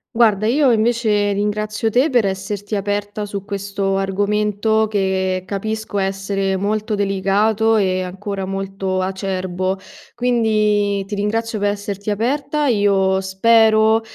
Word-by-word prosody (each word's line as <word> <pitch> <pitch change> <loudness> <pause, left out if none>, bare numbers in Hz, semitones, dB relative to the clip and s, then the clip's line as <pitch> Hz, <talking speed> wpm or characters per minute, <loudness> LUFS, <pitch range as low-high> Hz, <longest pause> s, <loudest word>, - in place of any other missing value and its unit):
Guarda 215 -3 +3
io 270 +2 +3
invece 220 -2 +2
ringrazio 210 +2 -1
te 255 +7 +3
per 245 -5 +3
esserti 195 +2 -3
aperta 205 +1 -2
su 200 -1 -5
questo 200 -1 -2
argomento 210 +2 +1
che 190 -2 0
capisco 215 +1 -3
essere 195 0 -1
molto 210 +3 -1
delicato 205 +3 +1
e 185 -3 +1
ancora 195 +1 -5
molto 195 0 -3
acerbo, 185 0 -2 0.4
quindi 215 -4 +1
ti 200 - -8
ringrazio 220 +2 -1
per 205 0 +1
esserti 205 0 -5
aperta. 275 +8 -1
Io 200 -4 +2
spero 220 +3 +4
205 Hz, 120 wpm, -19 LUFS, 195-220 Hz, 0.4 s, spero